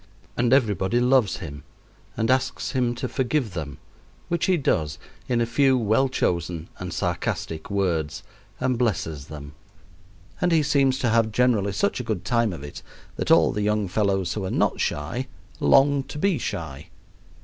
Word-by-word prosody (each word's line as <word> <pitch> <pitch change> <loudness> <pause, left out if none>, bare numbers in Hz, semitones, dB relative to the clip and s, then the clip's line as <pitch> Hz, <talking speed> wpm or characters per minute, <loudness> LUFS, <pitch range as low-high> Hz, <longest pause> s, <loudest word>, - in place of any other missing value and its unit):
and 120 0 +1
everybody 110 -4 +2
loves 125 -5 +3
him 70 -2 -8 0.5
and 115 +2 +1
asks 130 0 0
him 125 -3 0
to - - -3
forgive 130 -4 -1
them, 75 -5 -5 0.5
which 170 -1 0
he 185 -2 +3
does 80 - 0 0.3
in 120 -2 +2
a 120 - +2
few 130 +3 +3
well 115 +4 +2
chosen 85 -8 -1
and - - -5
sarcastic 80 -1 -3
words, 85 -7 -1 0.4
and 130 -2 0
blesses 80 - -1
them; 75 -1 -9 0.9
and 180 - +2
he 160 -2 +4
seems 140 -2 +2
to 120 - 0
have 115 -1 +2
generally 110 -4 +2
such 200 - 0
a - - -3
good 105 -5 -3
time 115 0 +2
of 80 -5 -7
it 75 - -8 0.3
that - - -3
all - - +5
the 105 - -2
young 105 -1 +1
fellows 95 -2 0
who 105 - -3
are 95 - -2
not - - +1
shy 80 - -2 0.3
long 140 +1 +4
to 135 +2 -9
be 180 -1 +1
shy. 70 -8 -5
110 Hz, 170 wpm, -24 LUFS, 85-130 Hz, 0.9 s, all